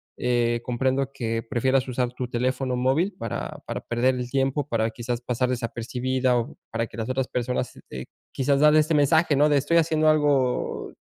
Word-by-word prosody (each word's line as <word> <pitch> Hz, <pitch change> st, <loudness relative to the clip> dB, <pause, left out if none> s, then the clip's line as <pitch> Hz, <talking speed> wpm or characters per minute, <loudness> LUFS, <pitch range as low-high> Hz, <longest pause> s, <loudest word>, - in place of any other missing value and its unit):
eh, 120 Hz, -1 st, 0 dB
comprendo 130 Hz, +2 st, 0 dB
que 115 Hz, -4 st, -2 dB
prefieras 130 Hz, +3 st, 0 dB
usar 125 Hz, -1 st, -2 dB
tu 125 Hz, 0 st, -4 dB
teléfono 130 Hz, +1 st, -1 dB
móvil 140 Hz, +10 st, +1 dB
para 115 Hz, -3 st, -5 dB
para -, -, -4 dB
perder 120 Hz, +2 st, +1 dB
el 125 Hz, -1 st, -4 dB
tiempo, 135 Hz, +2 st, 0 dB
para 115 Hz, -1 st, 0 dB
quizás 120 Hz, +1 st, -4 dB
pasar 125 Hz, 0 st, -1 dB
desapercibida 125 Hz, +1 st, -1 dB
o 115 Hz, -, -3 dB, 0.2 s
para 115 Hz, 0 st, -1 dB
que -, -, -13 dB
las 115 Hz, +1 st, -3 dB
otras 130 Hz, 0 st, -1 dB
personas, 125 Hz, +1 st, -2 dB, 0.2 s
eh, 65 Hz, 0 st, -7 dB, 0.3 s
quizás 140 Hz, +1 st, +1 dB
dar 150 Hz, +1 st, +6 dB
este 155 Hz, +1 st, +3 dB
mensaje 150 Hz, +1 st, +3 dB
¿no?, 150 Hz, +2 st, +4 dB
de 145 Hz, -, +4 dB
estoy 170 Hz, +5 st, +2 dB
haciendo 155 Hz, -1 st, +2 dB
algo 145 Hz, -5 st, +1 dB
130 Hz, 180 wpm, -25 LUFS, 120-140 Hz, 0.3 s, dar